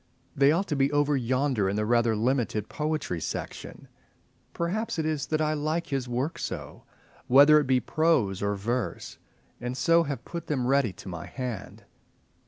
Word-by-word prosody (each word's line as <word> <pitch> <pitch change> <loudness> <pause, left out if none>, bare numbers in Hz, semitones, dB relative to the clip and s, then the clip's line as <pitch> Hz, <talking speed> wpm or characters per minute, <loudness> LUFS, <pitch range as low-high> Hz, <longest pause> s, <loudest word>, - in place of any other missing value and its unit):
They 140 +1 +5
ought 180 +5 0
to 150 - 0
be 140 0 +2
over 145 0 +2
yonder 130 -4 +1
in 100 - -1
the 105 0 0
rather 115 0 +2
limited 115 -2 0
Poetry 150 - -2
Section. - - -6 0.6
Perhaps 190 +6 -2
it 160 - -1
is 150 -3 -1
that 155 0 0
I 155 0 +1
like 155 +3 -1
his 135 -3 -3
work 130 +6 -2
so, - - -6 0.4
whether 145 +4 +7
it 145 - -2
be 130 -1 +3
prose 125 - +1
or 100 0 0
verse, 105 -2 -3 0.4
and 125 +1 -4
so 165 +7 +4
have 145 -4 -4
put 170 -2 -6
them 130 -5 -1
ready 135 -4 +2
to 95 - -13
my 85 -4 -6
hand. 125 -6 -6
135 Hz, 175 wpm, -27 LUFS, 115-155 Hz, 0.6 s, whether